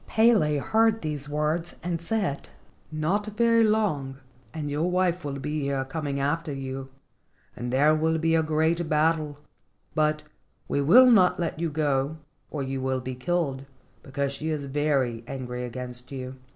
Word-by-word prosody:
Pele 220 -10 +4
heard 225 +7 +2
these 150 -2 -3
words, 155 +3 -1
and 170 -2 -2
said: 195 -6 -2 0.4
"Not 170 +8 0
very 230 0 +4
long 190 -12 +1 0.3
and 155 -2 -4
your 155 +5 0
wife 180 -1 +1
will 140 -1 -4
be 150 +2 -3
here 140 -1 -1
coming 140 -1 -3
after 150 +3 -1
you, 135 -1 -5 0.7
and 120 0 -4
there 145 +4 +4
will 160 +1 +1
be 165 0 +1
a 165 - +4
great 160 +1 +1
battle, 155 -1 +1 0.6
but 155 0 +1 0.4
we 140 - 0
will 200 - +8
not 200 -9 +5
let 165 -2 -2
you 170 -1 0
go 145 -1 0 0.3
or 145 -3 -3
you 135 0 -3
will 130 0 0
be 130 +1 -5
killed, 140 -1 -2 0.3
because 140 0 -2
she 155 +3 -4
is 150 -3 -2
very 135 -5 0
angry 125 -2 -5
against 125 +1 -7
you. 130 -1 -6
150 Hz, 160 wpm, -26 LUFS, 135-165 Hz, 0.7 s, will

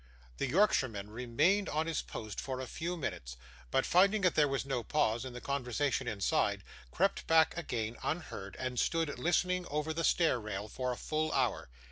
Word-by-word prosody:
The 135 - -1
Yorkshireman 125 - +2
remained 145 - +1
on 155 +2 0
his 165 -1 -1
post 110 -3 -7
for 130 -1 -4
a 130 - -3
few 170 +7 -4
minutes, 75 - -5 0.3
but, 135 0 +2
finding 200 +4 +4
that 180 -3 +3
there 150 -1 +4
was 135 -1 -1
no 135 -3 -1
pause 120 -3 +1
in 130 -2 -7
the 125 - -6
conversation 135 0 -1
inside, 100 -4 0 0.3
crept - - 0
back 160 0 +5
again 120 -9 -3
unheard, 145 - -4
and 130 -2 -2
stood, 165 -3 0
listening 180 +1 +1
over 150 +2 -1
the 165 +1 -2
stair 165 -8 +3
rail, 105 -1 -5
for 125 +2 -3
a 125 - -4
full 155 0 -1
hour. 125 - 0
135 Hz, 180 wpm, -33 LUFS, 120-165 Hz, 0.3 s, back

